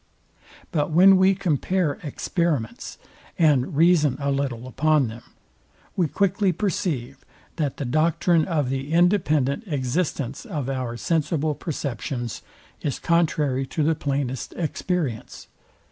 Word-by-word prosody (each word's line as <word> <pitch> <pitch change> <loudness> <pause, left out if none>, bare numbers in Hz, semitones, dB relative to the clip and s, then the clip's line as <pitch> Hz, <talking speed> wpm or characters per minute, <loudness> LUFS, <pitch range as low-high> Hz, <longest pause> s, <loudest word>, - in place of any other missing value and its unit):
But 150 -3 0
when 185 +5 +7
we 190 +1 +4
compare 180 -2 0
experiments, 150 - -2 0.4
and 145 -5 +3
reason 155 -5 +4
a 140 0 0
little 135 -4 -2
upon 150 -1 +2
them, 115 +2 -9 0.7
we 175 -4 +2
quickly 200 +3 +1
perceive, 165 - -2 0.3
that 150 -5 -1
the 140 - -3
doctrine 155 +4 +2
of 150 -7 -1
the 135 +2 -3
independent 165 - +2
existence 140 -2 -2
of 150 - -4
our 125 -3 -3
sensible 155 0 0
perceptions 125 - -4 0.4
is 140 - -2
contrary 150 -6 +1
to 155 - -1
the 160 +2 +3
plainest 135 -4 -3
experience. 160 - -3
150 Hz, 115 wpm, -24 LUFS, 135-170 Hz, 0.7 s, when